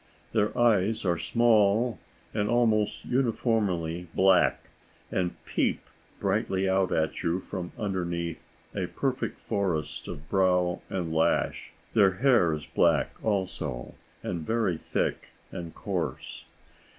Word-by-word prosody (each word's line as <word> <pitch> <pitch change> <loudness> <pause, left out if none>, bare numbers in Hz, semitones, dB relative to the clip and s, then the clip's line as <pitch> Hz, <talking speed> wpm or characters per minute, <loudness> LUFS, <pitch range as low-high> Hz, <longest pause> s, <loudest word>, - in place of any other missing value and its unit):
Their 105 - +1
eyes 110 -3 +3
are 85 -2 +1
small 115 0 +3 0.3
and 105 -1 0
almost 110 -3 +2
uniformly 105 -9 0
black, 95 -1 +4 0.4
and 90 -2 -1
peep - - 0 0.4
brightly 95 0 0
out 95 0 +2
at 80 0 0
you 85 +2 0
from 90 -1 -6
underneath 85 -5 -2 0.3
a 95 -3 -2
perfect 125 +5 -2
forest 80 -8 -2
of 70 +2 -7
brow 90 -1 +2
and 85 -4 -2
lash. 80 0 +1 0.2
Their 100 -4 +5
hair 120 -5 +4
is 75 -2 -4
black, 65 - +2
also, 95 - -2 0.3
and 85 - -3
very 110 -1 +1
thick - - -2 0.2
and 85 -2 -7
coarse. - - -4
95 Hz, 115 wpm, -28 LUFS, 85-110 Hz, 0.4 s, Their